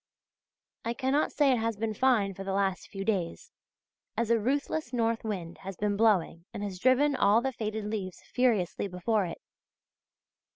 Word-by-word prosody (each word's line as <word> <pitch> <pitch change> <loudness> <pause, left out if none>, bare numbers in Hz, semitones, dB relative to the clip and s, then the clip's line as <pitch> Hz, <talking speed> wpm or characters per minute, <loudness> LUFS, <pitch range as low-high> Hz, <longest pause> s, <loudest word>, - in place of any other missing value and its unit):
I 235 +1 -2
cannot 275 +3 +1
say 285 -3 +3
it 250 - +2
has 225 -1 -1
been 220 0 -1
fine 215 -5 +2
for 195 - -7
the 195 0 -3
last 195 -1 0
few 195 0 -6
days, 190 -6 -2 0.7
as 230 0 +1
a 230 - +4
ruthless 280 +4 -1
north 230 -2 0
wind 185 -6 -4
has 195 -1 -7
been 205 -1 0
blowing 200 -6 +2
and 205 - -4
has 190 -3 -5
driven 265 +5 +4
all 205 -1 +5
the 265 +2 -1
faded 215 -2 -3
leaves 205 -4 -4
furiously 220 -7 +1
before 195 +2 0
it. 165 - -6
215 Hz, 170 wpm, -29 LUFS, 195-240 Hz, 0.7 s, all